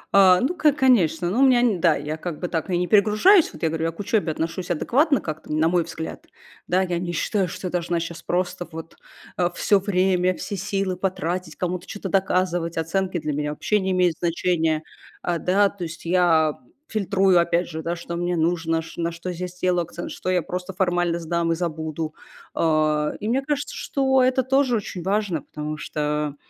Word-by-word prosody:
А, 185 -2 +7
ну, 285 +8 +1
ко 310 -4 +3
конечно. 185 - +3
Ну, 235 - 0
у - - +4
меня, 255 -3 +5
н 215 -8 +1
да, 165 -4 +4
я 150 +2 -4
как 165 -1 -5
бы 180 - -2
так, 165 +1 -2
ну, 180 - -1
и - - +2
не 180 - +1
перегружаюсь. 215 - +5
Вот - - -12
я 160 - +3
говорю, 165 0 -2
я 165 - 0
к 165 - -21
учёбе 205 -5 0
отношусь 165 +3 -4
адекватно 275 - +2
как-то, 155 -1 -6
на 155 +1 +2
мой 175 0 +2
взгляд. 160 0 -7 0.4
Да, 185 +2 +2
я 175 -2 -1
не 175 -1 -3
считаю, 190 +3 0
что 180 - -7
я 180 - -2
должна 175 -1 -1
щас 165 0 -6
просто 180 0 -2
вот, 160 0 -9 0.4
э, 175 -1 +2
всё 200 -2 +3
время, 185 -2 +1
все 200 - -5
силы 195 -1 -2
потратить, 180 -3 -2
кому-то 180 0 -3
чё-то 200 -2 -6
доказывать, 180 -3 0
оценки 180 +3 -1
для 150 -1 -3
меня 150 +1 -2
вообще 210 +7 0
не 190 0 -2
имеют 180 -3 +2
значения. 165 -2 0 0.4
Э, 170 -2 -1
да, 200 +2 +3
то 190 -3 -8
есть 170 +1 -7
я 165 -4 +3 0.3
фильтрую 195 -3 +2
опять 170 +1 +1
же, 160 -1 -6
да, 170 +1 -2
что 170 0 -6
мне 175 0 -1
нужно, 165 0 0
чт - - -12
на 170 0 -1
что 170 +2 -6
я 180 +1 -4
сделаю 180 0 0
акцент, 175 +1 -7
что 185 - -4
я 180 -3 +2
просто 180 +1 -5
формально 175 -2 +1
сдам 170 0 -1
и - - -1
забуду. 160 -2 -3 0.4
Э, 155 -1 +1
и 210 - -4
мне 260 +4 +1
кажется, 290 0 -3
что 265 -1 +1
это 260 0 +2
тоже 265 -1 +2
очень 195 -4 -4
важно, 195 -4 0
потому 150 +1 -6
что, 150 -1 -2
175 Hz, 205 wpm, -23 LUFS, 165-195 Hz, 0.4 s, А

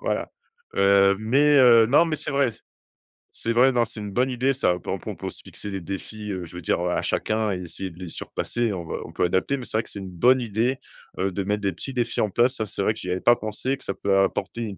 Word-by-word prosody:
Voilà, - - -2 0.4
heu, 100 0 +5
mais 140 +7 +3
heu, 120 -3 +7
non, 145 +8 +5
mais 160 -2 -1
c'est 150 - -5
vrai, 140 -4 +2 0.8
c'est 115 - -3
vrai, 130 +3 +5
non, 120 -2 +2
c'est 110 -1 -9
une 105 - -6
bonne 125 +5 +1
idée 130 +2 +1
ça. 125 -9 +1
On 90 - -7
peut - - -10 0.2
on - - -8
peut - - -6
aussi - - -7
se - - -16
fixer 105 - -8
des 95 -2 -4
défis, 105 +3 -6
heu, 90 -2 -4
je 85 - -13
veux 90 - -6
dire, 85 - 0
heu, 90 - 0
à - - 0
chacun 110 -1 0
et 90 - -4
essayer 95 +2 -6
de 85 0 -15
les 90 - -6
surpasser. 115 +6 -2
On 85 -2 -5
va - - -4
on - - -10
peut - - -1
adapter, 95 +10 0
mais 125 - -7
c'est - - -1
vrai 110 - +1
que - - -12
c'est 100 - -7
une 95 -1 -7
bonne 125 +9 +3
idée, 120 +3 0 0.4
heu, 95 +1 0
de 100 +2 -2
mettre 105 +1 -1
des 100 -1 0
petits 135 +10 -7
défis 120 -2 -1
en 105 - +1
place, 120 +6 +2
ça 110 - -2
c'est 100 - -4
vrai 110 - +2
que 110 - -9
j'y 90 - -6
avais 90 - -2
pas 120 - +6
pensé, 115 +5 -3
que - - -14
ça 100 - -3
peut 95 0 +1
apporter 95 +3 -1
une 105 -4 -5
110 Hz, 290 wpm, -24 LUFS, 95-125 Hz, 0.8 s, heu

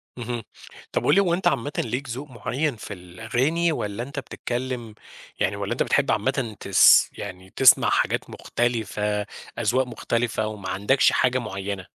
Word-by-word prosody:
اهم، 120 -1 -4 0.5
طَب - - -1
قُل - - +5
لي 200 - +6
هو 175 -3 +1
أنت 175 0 +1
عامةً 145 -4 0
ليك 125 +4 -2
ذوق 135 +5 -6
معيّن 125 +4 -2
في 105 - -8
الأغاني، 115 - -1
والّا 105 -4 -3
أنت 140 +1 -6
بتتكلم 120 -2 -5 0.4
يعني - - +1
والّا - - -4
أنت - - +1
بتحب - - +2
عامةً 115 -6 -1
تس 100 - +6
يعني 95 -2 -8
تسمع 130 - +6
حاجات - - 0
مختلفة، 105 -3 -1 0.3
أذواق 125 +3 +1
مختلفة، 115 -3 -1
وما 100 -3 -6
عندكش 105 +7 +3
حاجة 125 0 +2
معيّنة؟ 100 -3 -5
120 Hz, 155 wpm, -24 LUFS, 105-130 Hz, 0.5 s, لي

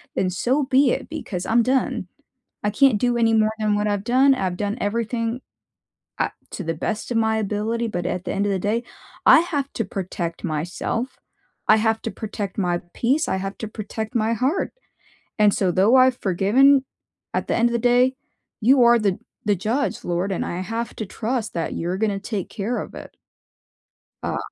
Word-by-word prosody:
then 185 - +1
so 250 +10 +1
be 265 0 +4
it, - - -3
because 215 - -5
I'm 235 +1 +3
done. 255 -7 0 0.6
I 210 - +2
can't 240 -1 +4
do 245 -1 +1
any 225 -1 +3
more 215 -1 +3
than 210 -1 +1
what 210 0 0
I've 205 -1 -1
done. 260 +4 +4
I've 185 -5 -2
done 205 +2 -2
everything, 230 +3 -1 0.8
uh, - - +1 0.2
to 195 - -5
the 165 0 -1
best 215 +9 -3
of 235 - -1
my 220 -1 +2
ability, 220 +3 -1
but 175 -4 -3
at 180 0 -3
the - - -3
end 200 +1 0
of 200 - +1
the 190 - 0
day, 215 +5 0 0.4
I - - +9
have 290 -5 -2
to 225 - -1
protect 175 -3 -4
myself. 175 - -3 0.5
I 215 - +7
have 220 0 +1
to 225 - -3
protect 205 -3 -5
my 175 -2 +1 0.2
peace. 275 +7 +1
I - - 0
have 195 +1 -5
to 220 - -5
protect 220 +1 -6
my 230 0 +1
heart, 270 - 0 0.7
and 210 -1 +5
so 185 -3 +1
though 200 +8 +4
I've 255 -1 +5
forgiven, 250 +9 +4 0.5
at - - -1
the - - +1
end 235 +1 +3
of - - -4
the 235 - +1
day, 245 +2 +3 0.5
you 255 +3 +5
are 235 0 +6
the 200 -3 0 0.3
the 205 -1 +3
judge, 230 +10 -1
Lord, 175 +3 -1
and 185 - -1
I 175 +2 -3
have 225 +4 -4
to 220 - -4
trust 225 +2 -3
that 165 -2 -2
you're 175 +3 -2
gonna 205 -2 0
take 205 -2 -4
care 225 +3 -3
of - - -7
it. - - -10 1.1
Uh - - -1
220 Hz, 195 wpm, -23 LUFS, 195-240 Hz, 1.1 s, I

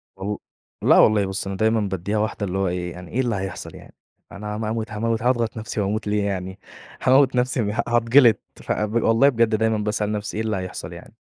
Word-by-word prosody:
والل 100 +2 -4 0.5
لأ، - - +6
والله 105 -2 +5
بُصي 95 0 -3
أنا 95 - -4
دايمًا 110 +1 +2
بادِّيها 100 +1 -2
واحدة، 105 -1 -1
اللي 95 +1 -3
هو 95 -1 +1
إيه 90 0 -3
يعني 90 0 -10
إيه 130 - -2
اللي 120 -4 -1
هيحصل 95 -1 -5
يعني، - - -14 0.4
أنا 105 +1 -6
ما 110 0 -3
أموت 110 0 -3
هاموت 115 +1 -1
هاضغط 120 -2 +1
نفْسي 110 -1 -3
وأموت 105 +2 -2
ليه 105 0 +1
يعني؟ 95 -1 -4 0.4
هاموّت 130 0 +4
نفْسي 125 0 +1
ه 115 +2 -1
هاتجلط 120 0 +5 0.2
ف - - -6
ب 105 +2 0
والله 115 +5 +5
بجد 115 -4 +2
دايمًا 110 0 +1
باسأل 105 0 -1
نفْسي 105 0 -4
إيه 110 - -1
اللي 110 -2 -1
هيحصل 95 0 -6
يعني؟ - - -12
105 Hz, 215 wpm, -23 LUFS, 100-115 Hz, 0.5 s, لأ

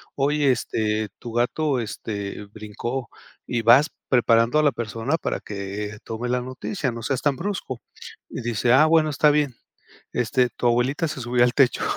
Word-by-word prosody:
Oye, 145 0 +2
este, 110 -3 -1
tu 120 - -7
gato, 130 +3 +1
este, 105 -3 -5
brincó 115 +4 -5 0.4
y 120 -1 -1
vas 130 +7 +6 0.2
preparando 120 +2 +4
a - - +3
la 145 - +4
persona 115 +6 -2
para - - -3
que 105 +1 -5
tome 115 +2 -4
la 125 0 +1
noticia, 130 +4 -3
no 115 0 -7
seas 130 +2 -1
tan 145 -3 +1
brusco". 170 - -4 0.5
Y - - -6
dice: 120 +1 +1
"Ah, 150 +4 +6
bueno, 160 -1 +4
está 150 +1 +4
bien. 145 -4 +1 0.6
Este, 125 +1 +1
tu 120 - -3
abuelita 125 +7 +2
se 135 - -5
subió 120 +1 +2
al 125 - +1
techo". 130 -4 +3
125 Hz, 170 wpm, -24 LUFS, 115-140 Hz, 0.6 s, vas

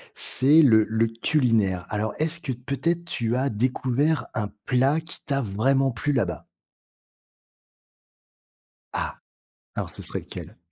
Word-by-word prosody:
c'est 145 +5 +5
le 110 -7 +6
le 110 +1 +1
culinaire. 115 - +1
Alors, 105 0 -2
est-ce 160 +2 0
que 135 -6 -3
peut-être 140 +7 -2
tu 120 -8 -2
as 135 +2 +1
découvert 130 +4 0
un 105 - -1 0.2
plat 135 +5 +2
qui 165 - -8
t'a 140 -1 0
vraiment 135 +5 +1
plu 120 +5 -1
là-bas? 95 -10 -1 2.5
Ah. - - -3 0.6
Alors - - -3
ce - - -6
serait - - -3
lequel? - - -9
130 Hz, 130 wpm, -25 LUFS, 110-145 Hz, 2.5 s, le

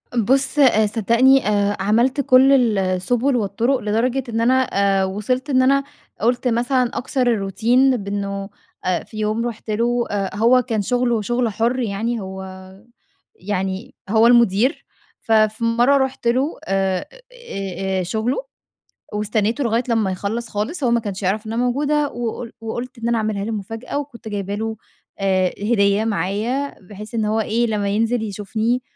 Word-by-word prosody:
بُص، 265 +6 +1
آآ، 230 -6 +5
صدّقني، 235 +4 +3
آآ، 205 -1 +1
عملت 235 +8 +2
كل 255 -4 +5
السبل 195 +8 +1
والطرق، 230 +4 +1
لدرجة 240 +5 0
إن 225 0 -1
أنا 260 +3 +4 0.4
آآ، - - +2
وصلت 230 +8 -2
إن 260 -2 +3
أنا 275 +2 +3 0.4
قلت 245 +3 +1
مثلًا 245 +1 +1
أكسر 250 +1 -1
الروتين 235 +5 +2
بأنه 200 -1 -4 0.4
آآ 180 -1 0
في 215 - -12
يوم 215 +2 -1
رُحت 230 -1 -8
له، 235 +3 +1
آآ، 195 -2 -2
هو 235 +4 +4
كان 220 -3 -2
شغله 240 +1 0
شغل 240 +2 0
حُر 230 +4 0
يعني، 230 +1 -2
هو 190 0 -7 0.9
يعني 190 +3 -4
هو 220 +2 +5
المدير، 235 - +3 0.4
ففي 215 0 +2
مرّة 240 +4 +3
رُحت 265 -3 -1
له 260 +7 +1
آآ، 190 -1 0 0.9
آآ، - - -1
شغله، 220 +7 -1 0.8
واستنيته 215 +4 0
لغاية 230 0 +1
لمّا 220 -4 +1
يخلص 210 +5 -3
خالص. 245 - -3
هو 245 - +2
ما 235 - +3
كانش 205 -3 -6
يعرف 205 +4 0
إنّ 220 - -4
أنا 235 +2 0
موجودة، 290 +4 +1
وقل 235 0 -5
وقلت 240 +3 -5
إن 230 0 -3
أنا 235 0 +1
أعملها 215 -2 -2
له 225 - -3
مفاجأة، 225 +5 -5
وكنت 255 -5 -9
جايبه 200 -1 -3
له 220 +1 -3 0.4
آآ 190 -1 +2
هديّة 205 -1 +2
معايا، 220 +8 -1
بحيث 210 +4 -10
إن 220 -2 0
هو 215 +1 0
إيه، 230 +2 0
لمّا 205 -2 -1
ينزل 225 +3 0
يشوفني. 220 +4 -2
225 Hz, 155 wpm, -20 LUFS, 205-245 Hz, 0.9 s, آآ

